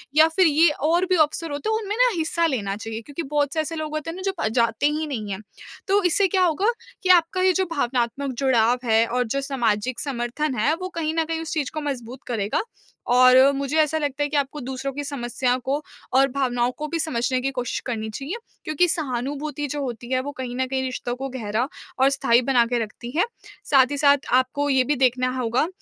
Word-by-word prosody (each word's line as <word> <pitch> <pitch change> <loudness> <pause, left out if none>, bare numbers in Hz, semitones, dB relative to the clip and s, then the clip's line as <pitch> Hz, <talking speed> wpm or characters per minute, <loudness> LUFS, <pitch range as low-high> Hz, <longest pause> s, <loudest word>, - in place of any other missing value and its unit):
या 315 +1 +7
फिर 370 -2 +5
ये 315 +2 +5
और 320 +5 +1
भी 370 - +4
अवसर 310 +1 +1
होते 285 +7 -3
हैं, 440 - +2
उनमें 415 0 -3
ना - - +5
हिस्सा 330 +1 +1
लेना 210 -10 -1
चाहिए 225 +1 -6
क्योंकि 285 +7 -6
बहुत 290 -1 0
से 320 - -1
ऐसे 320 +1 -4
लोग 310 -1 -4
होते 310 +1 -3
हैं 330 - -6
ना - - -7
जो 390 - 0
प 220 - +1
जाते 230 +3 +1
ही 305 +1 -1
नहीं 220 -8 -4
हैं। 190 - -4 0.5
तो 400 +1 +3
इससे 365 +3 +3
क्या 375 +1 +2
होगा 355 +4 +1 0.4
कि 370 - -1
आपका 360 +1 +4
ये 370 0 +4
जो 380 +1 +1
भावनात्मक 260 -1 -1
जुड़ाव 245 -3 +3
है 225 0 +4
और 250 +2 0
जो 275 +5 -1
सामाजिक 245 -4 -1
समर्थन 260 +2 -2
है, 235 +7 +2
वो 370 +2 -6
कहीं 320 -1 -1
न 325 - +2
कहीं 325 0 -3
उस 325 - -5
चीज़ 295 -5 -1
को 310 - -3
मजबूत 255 -3 -5
करेगा 215 -4 -1 0.5
और 255 0 +7 0.2
मुझे 280 +2 -2
ऐसा 310 +1 +1
लगता 290 -2 -1
है 290 - -1
कि 295 - 0
आपको 285 +1 -1
दूसरों 265 +2 -4
की 290 +2 -4
समस्याओं 250 -2 -1
को 280 +3 0 0.3
और 270 +1 +5
भावनाओं 250 -2 0
को 305 - -4
भी 330 +2 -3
समझने 255 -4 0
की 270 +2 -1
कोशिश 250 -2 -3
करनी 220 -3 -3
चाहिए 275 - -5 0.3
क्योंकि 310 +3 +2
सहानुभूति 290 0 -2
जो 290 +1 -4
होती 245 -2 -5
है 255 - +2
वो 285 +2 -5
कहीं 245 -1 -4
न 260 +1 0
कहीं 265 0 -1
रिश्तों 250 -1 -3
को 270 +2 -5
गहरा 235 -1 -2 0.3
और 265 +1 +5
स्थायी 250 -3 +3
बना 250 -2 +3
के 240 - +2
रखती 225 +2 -9
है। 355 - +5 0.4
साथ 270 -2 +4
ही 285 - -2
साथ 285 0 +5 0.2
आपको 260 +3 +2
ये 265 -2 +4
भी 295 +4 0
देखना 255 -1 +2
होगा 245 +4 +1
275 Hz, 230 wpm, -23 LUFS, 245-310 Hz, 0.5 s, या